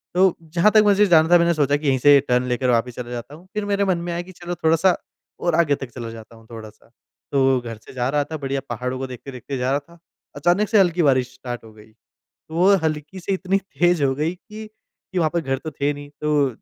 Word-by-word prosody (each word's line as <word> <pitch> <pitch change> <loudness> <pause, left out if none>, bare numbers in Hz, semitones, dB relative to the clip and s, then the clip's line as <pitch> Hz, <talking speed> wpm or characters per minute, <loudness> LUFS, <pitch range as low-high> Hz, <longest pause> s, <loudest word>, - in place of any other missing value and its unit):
तो 185 -1 +4 0.2
जहाँ 180 +5 +4
तक 215 -1 +6
मुझे 205 0 +4
जाना 160 -3 +5
था 175 - +7
मैंने 170 0 +3
सोचा 145 -2 +2
कि 150 -1 -4
यहीं 135 -1 +3
से 145 +1 +7
टर्न 125 0 +2
लेकर 125 +1 0
वापस 120 0 +1
चला 120 -1 -6
जाता 120 +4 -7
हूँ। 180 +4 -17
फिर 210 -1 -2
मेरे 200 0 +1
मन 185 -3 +1
में 175 0 -4
आया 170 - -2
कि 185 +1 -12
चलो 175 0 -6
थोड़ा-सा 165 +2 +3 0.4
और 170 -2 0
आगे 150 -4 +3
तक 135 -3 -8
चला 115 -2 -6
जाता 115 0 -12
हूँ 115 0 -18
थोड़ा-सा। 110 -1 -11 0.4
तो 135 -2 +3
घर 115 -2 -7
से - - -13
जा 125 -1 -1
रहा 145 0 +1
था 155 +2 -6
बढ़िया 135 -1 -3
पहाड़ों 125 +2 -3
को 135 - -4
देखते-देखते 130 +1 -7
जा 125 +1 -1
रहा 140 - +2
था 170 +4 -20 0.4
।अचानक 180 +8 +2
से 220 -3 +4
हल्की 175 -2 +3
बारिश 130 -2 +2
स्टार्ट 120 -2 -7
हो 110 - -13
गई 110 0 -17 0.6
तो 160 - -8
वो 190 +4 +5
हल्की 155 +3 -3
से 195 +2 -2
इतनी 190 +1 0 0.2
तेज़ 175 -3 +3
हो 135 -1 +2
गई 155 +4 -1
कि 215 +3 -11 0.5
कि 185 - -2
वहाँ 160 -2 +2
पर 170 - +1
घर 135 -3 -2
तो 155 +2 -7
थे 145 +1 -1
नहीं। 145 0 -10
तो 150 -2 +2
145 Hz, 250 wpm, -22 LUFS, 130-175 Hz, 0.6 s, था